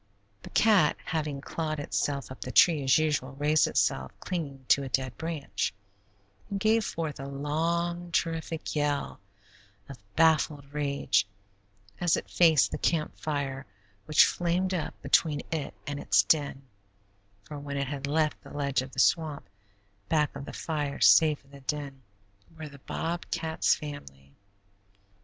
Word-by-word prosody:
The - - -10
cat, 205 -9 +4
having 150 -3 -2
clawed 155 0 -3
itself 140 -2 -2
up 125 -6 -10
the 125 - -4
tree, 160 0 +5
as 130 0 +5
usual, 150 -4 0
raised 150 +2 +3
itself, 65 0 0
clinging 140 -7 -5
to 140 - +5
a 135 - -5
dead 130 -2 -1
branch, 160 - -3 0.7
and 200 - -2
gave 220 +2 +3
forth 160 -7 -4
a 135 - -6
long, 170 +5 -2
terrific 165 -1 -2
yell 145 -1 -1 0.7
of 135 -3 -10 0.2
baffled 155 -3 +2
rage 140 -8 +1 0.7
as 175 -3 +2
it - - -7
faced 160 -4 +4
the - - -4
camp 160 -3 0
fire, 140 -4 -3 0.4
which 155 - +6
flamed 180 +2 0
up 165 -5 -3
between 150 -3 +2
it 160 -3 -3
and 145 0 -4
its - - +3
den, 145 -3 +1 0.8
for 150 +4 -8
when 140 0 -5
it 140 - 0
had 140 0 -4
left 155 +1 0
the - - -13
ledge 140 -2 -1
for 130 - -2
the 135 - -16
swamp, 155 +1 +1 0.6
back 150 -3 +1
of 140 0 -6
that - - -8
fire, 145 -3 -3
safe 155 -3 +5
in 135 - -23
the 140 -1 -13
den 140 -1 -4 0.6
were 155 -1 -6
the 140 -1 -13
bobcat's 165 +1 -1
family. 70 - -10
150 Hz, 150 wpm, -28 LUFS, 140-160 Hz, 0.8 s, which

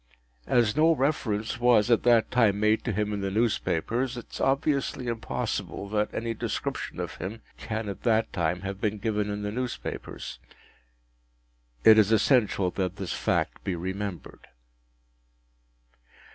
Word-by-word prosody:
As 115 -3 +3
no 160 +2 +5
reference 125 -6 -1
was 120 -2 +4
at 115 - +5
that 120 -2 +4
time 110 -5 +3
made 105 +1 +2
to 120 - 0
him 105 +1 -1
in 100 - -3
the 100 - -1
newspapers, 115 +3 0
it 120 - -7
is - - -6
obviously 140 -1 0
impossible 115 -3 -3
that 105 0 0
any 115 0 -2
description - - -4
of - - -5
him 105 +6 -6 0.2
can 110 -1 -4
at 100 -2 -6
that 115 -2 +1
time 90 +1 0
have 100 0 -5
been 105 -1 0
given 105 -1 -1
in 105 0 -3
the 105 - -2
newspapers. 125 +2 -5 1.4
It 110 0 +8
is 105 0 +4
essential 105 -4 +3
that 95 -1 -2
this 95 -4 -4
fact - - -1
be 95 - -2
remembered. 95 +2 -5
110 Hz, 145 wpm, -27 LUFS, 100-120 Hz, 1.4 s, It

